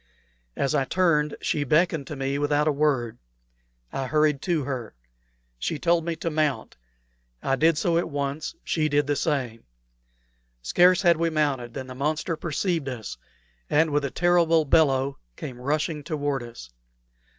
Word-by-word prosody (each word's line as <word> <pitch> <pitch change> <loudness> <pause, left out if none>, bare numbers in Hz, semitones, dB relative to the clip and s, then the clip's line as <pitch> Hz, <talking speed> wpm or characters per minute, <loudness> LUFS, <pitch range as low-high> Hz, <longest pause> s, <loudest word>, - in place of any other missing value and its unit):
As 140 - 0
I 145 -2 +2
turned, 150 -1 +1
she 145 - 0
beckoned 155 0 +1
to 150 - -6
me 135 +1 -2
without 145 +1 +1
a - - +4
word. 140 -6 0 0.7
I 135 - -2
hurried 150 -1 +2
to 170 -5 0
her. 125 - -5 0.6
She 155 - -2
told 170 +1 +1
me 170 -1 -2
to 165 +1 -3
mount. 150 -3 -1 0.7
I 135 - +1
did 160 +3 +3
so 170 +2 +2
at 170 - -3
once; 145 - -3
she 155 -2 0
did 145 0 +2
the 145 +1 0
same. 130 -6 -2 1.0
Scarce 180 - +4
had 170 -3 +5
we 165 0 +1
mounted 140 -7 -1
than 130 - -5
the 130 - -8
monster 150 +5 -1
perceived 165 -2 -2
us, 120 -4 -6 0.5
and 160 +1 +3
with 145 0 +1
a 140 - -1
terrible 170 -1 +3
bellow 140 -3 +2 0.2
came 125 -2 -8
rushing 150 +2 -1
toward 145 -3 -2
us. 115 - -10
150 Hz, 160 wpm, -25 LUFS, 135-160 Hz, 1.0 s, had